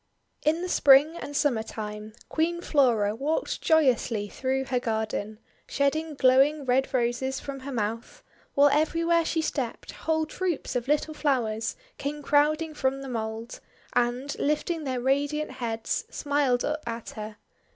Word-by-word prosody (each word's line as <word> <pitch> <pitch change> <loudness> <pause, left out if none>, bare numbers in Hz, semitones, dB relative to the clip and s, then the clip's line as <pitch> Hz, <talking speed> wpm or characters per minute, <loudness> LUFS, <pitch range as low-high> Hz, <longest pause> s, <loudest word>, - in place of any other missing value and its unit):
In 320 +3 +1
the - - -2
Spring 290 -1 +6
and 290 -4 -7
Summer 275 -7 +2
time, 215 -1 -7
Queen 340 +2 0
Flora 240 -11 +2
walked 290 +7 -2
joyously 255 -9 +2
through 265 +3 -1
her 255 -1 0
garden, 220 -2 -2 0.3
shedding 305 +2 0
glowing 275 +3 +4
Red 260 +1 +2
Roses 255 +1 0
from 275 -1 -6
her 270 +1 -7
mouth; 230 -1 -4 0.3
while 285 +1 +6
everywhere 330 +3 +2
she 320 0 -1
stepped, 260 -7 -3
whole 315 -1 -1
troops 350 -2 -3
of 245 0 -1
little 300 +2 +1
flowers 230 -7 0 0.2
came 295 +1 -4
crowding 305 +3 +2
from 270 -2 -1
the 270 - -6
mould, 225 0 -4 0.3
and, 245 +4 0
lifting 305 +2 -1
their 260 -2 -1
radiant 285 +4 0
heads, 230 -3 -3
smiled 285 -4 +1
up 305 +1 -2
at 230 0 -5
her. 215 0 -7
270 Hz, 145 wpm, -27 LUFS, 235-300 Hz, 0.3 s, Spring